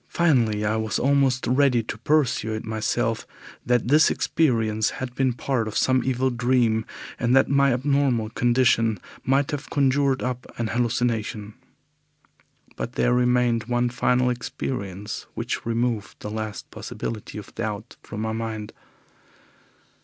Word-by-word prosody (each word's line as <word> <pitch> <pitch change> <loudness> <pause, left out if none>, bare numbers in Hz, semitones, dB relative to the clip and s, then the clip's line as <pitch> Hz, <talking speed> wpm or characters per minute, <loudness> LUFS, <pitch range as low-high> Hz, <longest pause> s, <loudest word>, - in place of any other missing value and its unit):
Finally, 115 -11 +2
I 110 +1 +1
was 110 -2 -1
almost 135 -1 +2
ready 125 -1 +3
to 110 - -5
persuade 115 -4 0
myself 110 0 -1 0.4
that 120 -1 +1
this 155 +3 +6
experience 110 -8 +1
had 125 -1 -5
been 130 0 +1
part 120 -1 -1
of 110 - -3
some 130 -1 +3
evil 130 0 +1
dream, 120 -2 +2 0.3
and 120 +2 +2
that 135 - +4
my 140 0 +4
abnormal 130 -3 +1
condition 115 -3 +2 0.3
might 135 +1 +2
have 145 -1 -5
conjured 140 -1 +2
up 125 -1 -4
an 115 -1 -1
hallucination. 115 -3 -1 1.2
But 120 - -5
there 125 - +2
remained 125 -2 +2
one 120 0 +1
final 125 +1 +2
experience 105 -5 -5
which - - -3
removed 115 -2 -1
the 105 - -5
last 110 -1 -5
possibility 110 -1 -6
of 105 - -9
doubt 110 0 -5
from 105 - -7
my 110 0 -1
mind. 110 -1 -4
120 Hz, 135 wpm, -24 LUFS, 110-130 Hz, 1.2 s, this